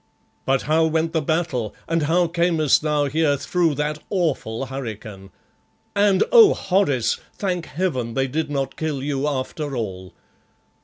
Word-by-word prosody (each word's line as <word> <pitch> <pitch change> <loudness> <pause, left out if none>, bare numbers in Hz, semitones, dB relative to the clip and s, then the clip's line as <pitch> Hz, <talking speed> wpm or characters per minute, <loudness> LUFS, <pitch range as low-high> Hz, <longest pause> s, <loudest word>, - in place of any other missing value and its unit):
But 135 0 +2
how 160 +1 +2
went 160 +1 0
the 160 - +1
battle, 150 -8 -1
and 165 0 0
how 170 +4 +2
camest 170 -3 +2
thou 150 -1 +1
here 145 0 +1
through 165 +2 0
that 150 +1 -2
awful 145 - -1
hurricane? 110 -7 -7 0.7
And, 200 -2 +4
oh, 460 -4 +8
Horace, 180 - +1 0.2
thank 180 -4 -2
heaven 130 -8 -2
they 135 0 +1
did 150 +3 -2
not 135 -2 -3
kill 150 -4 -3
you 140 0 -1
after 145 +1 -3
all!" 95 -6 -5
150 Hz, 145 wpm, -22 LUFS, 135-165 Hz, 0.7 s, oh